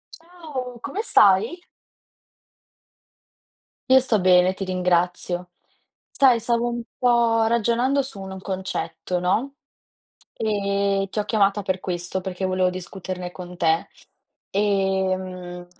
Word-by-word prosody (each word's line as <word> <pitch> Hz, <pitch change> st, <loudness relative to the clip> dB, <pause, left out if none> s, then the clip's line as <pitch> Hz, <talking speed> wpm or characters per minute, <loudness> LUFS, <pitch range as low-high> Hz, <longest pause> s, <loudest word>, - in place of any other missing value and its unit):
Ciao! 310 Hz, -8 st, -8 dB
Come 290 Hz, +11 st, -3 dB
stai? 215 Hz, -, +4 dB, 2.3 s
Io 260 Hz, 0 st, +8 dB
sto 235 Hz, -6 st, +1 dB
bene, 180 Hz, 0 st, +5 dB
ti 190 Hz, -, -6 dB
ringrazio. 180 Hz, -1 st, 0 dB, 0.6 s
Sai, 260 Hz, -4 st, +4 dB
stavo 235 Hz, +1 st, +1 dB
un 240 Hz, 0 st, -3 dB, 0.2 s
po' 235 Hz, -2 st, +3 dB
ragionando 235 Hz, +4 st, +2 dB
su 255 Hz, -7 st, -6 dB
un 190 Hz, 0 st, -7 dB
concetto, 190 Hz, -1 st, -4 dB
no? 220 Hz, +10 st, 0 dB, 0.8 s
Ehm, 200 Hz, -2 st, 0 dB
ti -, -, -5 dB
ho 210 Hz, -, 0 dB
chiamata 205 Hz, -1 st, +2 dB
per 185 Hz, -1 st, -2 dB
questo, 175 Hz, 0 st, -3 dB
perché 190 Hz, 0 st, -3 dB
volevo 185 Hz, 0 st, +1 dB
discuterne 180 Hz, 0 st, -6 dB
con 180 Hz, 0 st, -10 dB
te, 165 Hz, -2 st, +1 dB, 0.6 s
ehm, 190 Hz, -3 st, -1 dB
195 Hz, 110 wpm, -23 LUFS, 185-235 Hz, 2.3 s, Io